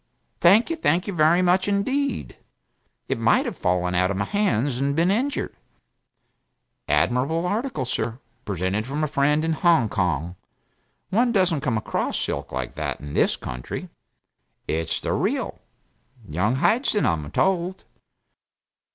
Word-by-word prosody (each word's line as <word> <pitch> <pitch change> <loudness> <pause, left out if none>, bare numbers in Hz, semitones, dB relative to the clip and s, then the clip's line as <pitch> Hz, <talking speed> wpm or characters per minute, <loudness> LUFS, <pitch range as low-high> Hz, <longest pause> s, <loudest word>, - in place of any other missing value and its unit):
Thank 210 - +5
you - - 0
thank 180 - +1
you 200 - -4
very 170 +2 +4
much 185 +2 +3
indeed. 260 +6 -1 0.7
It - - -1
might - - +3
have - - -4
fallen 90 0 0
out 90 +1 +2
of 100 - -2
my 100 - 0
hands 135 - 0
and 140 +1 0
been 170 +4 +3
injured. 260 +7 -1 1.3
Admirable 125 - +1
article, 210 - -2
sir 120 -1 -2 0.3
present 100 +3 -2
from 145 +3 -2
a - - +2
friend 150 +2 +2
in 165 - +1
Hong 160 - +3
Kong; 90 -3 -1 0.7
one 235 +4 +3
doesn't 185 -8 +2
come 130 -6 0
across 110 - -2
silk - - -3
like 65 -1 -4
that - - -3
in 75 0 -8
this - - +2
country 60 0 -6 0.8
it's 80 0 -1
the - - -2
real - - -1 0.7
Young 95 +10 0
Hyson, 210 - +2
I'm 75 -3 0
told." 185 - 0
150 Hz, 145 wpm, -24 LUFS, -, 1.3 s, Thank